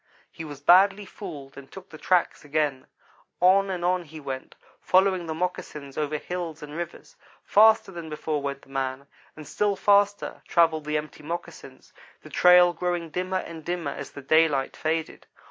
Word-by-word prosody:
He 165 - -8
was 145 -3 -9
badly 195 +5 +5
fooled 155 -9 -9
and 135 -1 -12
took 190 -1 -12
the 155 - -12
tracks 180 +2 +1
again. 145 -3 -1 0.5
On 195 +2 +4
and 180 -2 -3
on 180 0 +2
he 155 +1 -11
went, 135 -2 -7 0.3
following 185 -2 +2
the 160 - -3
moccasins 150 -5 -5
over 150 0 -1
hills 165 -1 -6
and 150 0 -9
rivers. 170 0 -7 0.3
Faster 220 -1 +5
than 170 -3 -8
before 150 -1 -3
went 140 0 -5
the - - -20
man, 135 0 -3 0.3
and 155 -2 -11
still 205 +4 0
faster 205 +1 +2
travelled 165 -3 +2
the 150 0 0
empty 150 0 -7
moccasins, 170 +3 -8 0.3
the - - -13
trail 180 0 +6
growing 175 -1 -3
dimmer 185 +3 -2
and 165 -1 -9
dimmer 170 -3 -3
as 140 - -7
the 140 - -11
daylight 150 -2 +2
faded. 160 0 -3
165 Hz, 170 wpm, -25 LUFS, 150-180 Hz, 0.5 s, trail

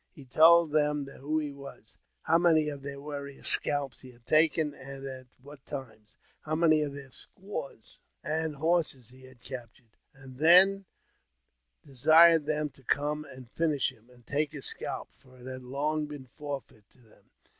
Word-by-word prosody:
He 140 -5 -15
:old 165 0 +6
them 150 -1 +1
who 140 +3 -4
he 150 -2 -2
was, 140 -5 -13 0.3
how 165 +1 +3
many 160 -3 +3
of 140 -2 -7
their 140 0 -7
warriors' 140 -1 -4
scalps 140 -3 +3
he 130 - -13
lad 120 -1 -23
taken, 155 0 +2
and 135 0 -10
at 130 -1 -8 0.2
what 145 -1 -14
times; 115 -7 -9 0.3
how 155 0 -3
many 155 -1 +3
of 145 -2 -3
their 140 -2 -11
squaws 160 - -9 0.2
and 155 -1 -3
lorses 160 -7 0
he 130 +1 -17
had 130 -2 -18
captured; 120 -3 -11 0.2
and 135 -1 -14
then 190 +5 +6 1.0
desired 155 +3 +5
them 150 -1 -1
to 135 +1 -23
come 150 +4 -1
and 130 -3 -13
inish 155 -5 0
him, 115 +3 -24
and 120 -1 -21
take 145 +1 -2
his 140 -3 -7
scalp, - - -3
for 130 -1 -21
it 125 - -14
had 130 0 -7
long 150 +4 -2
been 145 -3 -9
forfeit 135 -6 -9
to - - -28
hem. 115 -4 -24
145 Hz, 170 wpm, -29 LUFS, 130-155 Hz, 1.0 s, old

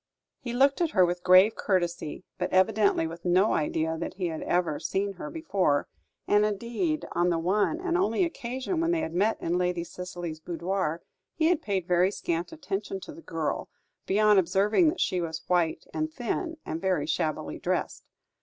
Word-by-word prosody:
He 245 - -5
looked 275 +5 +3
at 340 - +2
her 185 -3 +6
with 175 0 -2
grave 185 +4 +6
courtesy, 175 -4 -1 0.2
but - - -1
evidently 200 -1 +3
with 165 +1 -7
no 185 +4 +3
idea 160 +1 -1
that 170 - -4
he 185 -2 -2
had 160 - -5
ever 175 -4 0
seen 200 +1 -1
her 195 +10 -7
before; 200 - 0 0.4
and, 205 0 +4
indeed, 235 - -1
on 175 +1 +2
the 170 - +1
one 200 - +1
and 360 -1 -1
only 380 +1 +2
occasion 265 +2 -3
when 335 - +1
they 340 -1 +1
had 160 - -4
met 205 +5 +1
in 175 +2 0
Lady 180 -1 0
Cicely's 175 -2 -6
boudoir, 170 0 -2 0.3
he 320 0 +3
had 350 -3 +2
paid 195 -4 -1
very 180 +1 +4
scant 170 -4 -3
attention 200 -11 -4
to - - -9
the - - -12
girl, 165 -2 -3 0.4
beyond 210 0 +5
observing 205 - +3
that 345 - -4
she 180 - +1
was 160 -1 -4
white 175 -3 +1
and 310 0 -2
thin, 320 +5 -3
and 160 - -4
very 185 -6 +1
shabbily 155 - -2
dressed. - - -2
185 Hz, 180 wpm, -27 LUFS, 170-235 Hz, 0.4 s, her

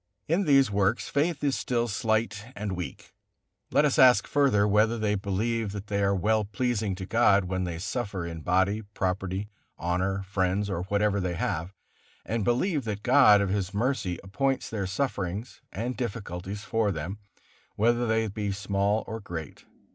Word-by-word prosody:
In 175 +5 +1
these 135 -6 +5
works 100 +3 +1
faith 150 +1 0
is 140 -2 +2
still 120 -1 0
slight 110 -1 -1
and 105 -1 -3
weak; 90 -1 -7 0.6
let 150 - +3
us 150 +1 +1
ask 130 -2 +7
further, 135 -8 +3
whether 105 +3 +3
they 110 -2 0
believe 105 +2 -1
that 100 -1 -6
they 100 -1 -1
are 100 0 +2
well 110 +3 +2
pleasing 105 -1 -1
to 95 0 -6
God 100 -3 +4
when 95 0 -2
they 85 -2 -4
suffer 100 -1 -3
in 85 -1 -6
body, 95 +5 +1
property, 95 -1 -3 0.3
honor, 95 +3 -1
friends, 95 +1 0
or 90 -1 -2
whatever 100 +1 +1
they 90 -2 -2
have, 85 +1 -2 0.5
and 110 +1 -1
believe 140 - +1
that 105 -2 -4
God 125 -6 +6
of 100 - 0
His 100 0 -2
mercy 110 -6 0
appoints 135 +7 -1
their 100 -4 -2
sufferings 100 -1 -3
and 120 +5 -3
difficulties 100 -4 -5
for 110 -2 0
them, 90 +5 -5 0.6
whether 120 +3 +2
they 110 0 +1
be 105 0 -3
small 100 +2 0
or 110 - -5
great. 85 -7 -8
105 Hz, 165 wpm, -27 LUFS, 95-115 Hz, 0.6 s, ask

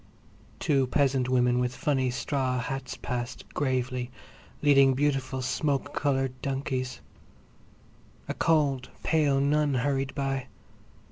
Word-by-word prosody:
Two 135 -3 +2
peasant 135 -2 +2
women 125 -1 +3
with 125 0 -1
funny 135 -3 +1
straw 130 0 -1
hats 130 +1 -4
passed, 125 +1 -4
gravely, 130 -3 -1 0.5
leading 135 -2 +6
beautiful 135 -2 0
smoke 145 +2 -1
coloured 135 -3 0
donkeys. 130 -2 -3 1.3
A - - -2
cold, 145 -6 +1
pale 150 -4 +3
nun 145 0 +2
hurried 135 +1 0
by. 135 -1 -2
135 Hz, 110 wpm, -28 LUFS, 130-140 Hz, 1.3 s, leading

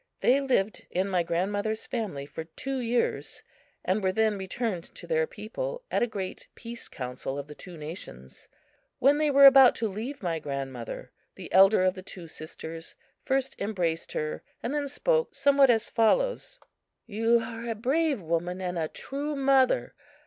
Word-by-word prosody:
They 265 +3 +4
lived 235 -7 0
in 185 +2 0
my 185 -2 +2
grandmother's 205 +6 -1
family 200 - -3
for 160 +2 -7
two 265 +11 -4
years, 240 0 -1 0.4
and 190 +4 +1
were 190 - +3
then 220 +1 +2
returned 190 -1 -3
to - - -9
their 480 -1 +1
people - - -5
at - - +1
a 240 - +3
great 195 -4 -6
peace 235 0 -8
council 130 +1 -5
of 140 - -4
the 150 - -10
two 175 +3 -11
nations. 65 - -9 0.5
When 285 +3 +4
they 305 -1 +3
were 280 0 +7
about 270 -2 +9
to 225 - -1
leave 220 +6 -6
my 165 -2 -1
grandmother, 135 -5 -5 0.2
the - - -10
elder 195 0 +7
of 185 0 +3
the 185 - -9
two 180 -2 -10
sisters 160 +1 -8 0.3
first 270 0 0
embraced 175 -6 -2
her, 155 0 -3 0.2
and 240 - -2
then 295 -1 -1
spoke 480 - 0
somewhat 280 -1 +5
as 230 -1 +3
follows: - - +1 0.5
"You 225 +3 +2
are 230 0 -6
a 225 - -1
brave 275 - +1
woman 170 +3 -1
and 180 -2 -3
a 160 - 0
true 285 - -4
mother. 270 - +3
220 Hz, 170 wpm, -28 LUFS, 175-270 Hz, 0.5 s, about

